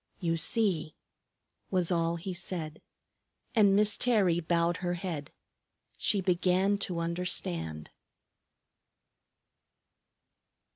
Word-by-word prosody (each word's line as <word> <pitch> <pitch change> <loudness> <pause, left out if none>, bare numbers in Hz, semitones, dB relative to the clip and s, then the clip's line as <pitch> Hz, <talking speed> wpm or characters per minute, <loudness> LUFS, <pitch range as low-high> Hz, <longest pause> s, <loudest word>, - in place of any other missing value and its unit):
"You 165 -3 0
see!" 165 -3 0 0.7
was 185 -2 +1
all 170 -1 +1
he 175 +3 -5
said. 170 -3 -5 0.7
And 205 -4 +5
Miss 210 0 +3
Terry 200 -9 +3
bowed 170 0 +1
her 175 -1 -2
head. 170 -5 -5 0.6
She 200 - +2
began 185 +2 +2
to 180 -3 -3
understand. 90 - -2
175 Hz, 90 wpm, -30 LUFS, 165-190 Hz, 0.7 s, And